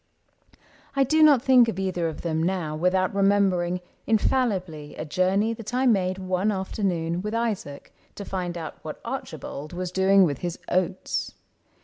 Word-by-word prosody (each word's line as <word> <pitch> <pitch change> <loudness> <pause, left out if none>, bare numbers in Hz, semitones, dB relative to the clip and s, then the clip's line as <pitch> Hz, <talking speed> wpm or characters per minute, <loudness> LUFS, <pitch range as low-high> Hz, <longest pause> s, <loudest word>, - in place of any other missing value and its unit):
I 275 - +4
do 310 +4 +2
not 290 -5 +6
think 255 -3 +6
of 225 - -3
either 185 -3 -1
of 160 -2 -6
them 160 -2 -1
now 170 -3 -1
Without 180 +4 +1
remembering, 195 -3 +2 0.3
infallibly, 195 - 0
A - - -5
journey 190 +7 +1
that 225 +1 -6
I 260 +1 +2
made 185 -6 +2
one 185 +2 0
afternoon 180 -3 -2
With 210 +3 -3
Isaac 215 -11 -3 0.2
to 200 - -7
find 180 -3 -3
out 160 -2 -7
what - - -7
Archibald 150 +3 -6
Was 180 0 -4
doing 190 +1 +5
with 145 -6 0
his 175 -1 -4
oats. 185 +1 -1
185 Hz, 155 wpm, -25 LUFS, 175-210 Hz, 0.3 s, not